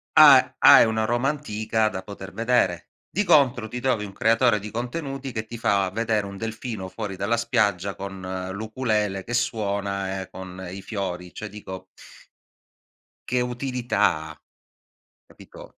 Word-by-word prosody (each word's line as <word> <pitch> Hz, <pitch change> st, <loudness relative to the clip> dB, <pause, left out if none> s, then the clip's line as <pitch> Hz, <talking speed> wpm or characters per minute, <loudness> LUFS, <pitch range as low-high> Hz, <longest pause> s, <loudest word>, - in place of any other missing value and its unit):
ha -, -, +8 dB
hai -, -, +9 dB
una 110 Hz, -1 st, 0 dB
Roma 120 Hz, +4 st, +1 dB
antica 110 Hz, -6 st, -1 dB
da 95 Hz, -, -6 dB
poter 100 Hz, 0 st, -9 dB
vedere. 115 Hz, -7 st, +1 dB, 0.2 s
Di 205 Hz, -, 0 dB
contro, 135 Hz, -, +4 dB
ti 125 Hz, +3 st, -5 dB
trovi 120 Hz, -5 st, 0 dB
un 100 Hz, -, -9 dB
creatore 115 Hz, +1 st, +3 dB
di 105 Hz, +1 st, -7 dB
contenuti 135 Hz, +4 st, -4 dB
che 110 Hz, -2 st, -4 dB
ti 115 Hz, -, -7 dB
fa 100 Hz, -4 st, +1 dB
vedere 110 Hz, 0 st, 0 dB
un 100 Hz, 0 st, -8 dB
delfino 110 Hz, -2 st, -5 dB
fuori 100 Hz, 0 st, -5 dB
dalla 100 Hz, +5 st, 0 dB
spiaggia, 105 Hz, -5 st, 0 dB
con 95 Hz, -1 st, -6 dB
l'ukulele 105 Hz, -2 st, -1 dB
che 120 Hz, -, -6 dB
suona 100 Hz, -5 st, -1 dB
e 95 Hz, -, -9 dB
con 95 Hz, 0 st, -8 dB
i 95 Hz, +1 st, -7 dB
fiori. 90 Hz, -4 st, -5 dB
Cioè, 110 Hz, -, -7 dB
dico 95 Hz, -2 st, -9 dB, 1.4 s
che 125 Hz, 0 st, 0 dB
utilità 120 Hz, -, 0 dB
ha, 75 Hz, -, -13 dB, 0.9 s
capito? -, -, -15 dB
110 Hz, 150 wpm, -24 LUFS, 95-120 Hz, 1.4 s, hai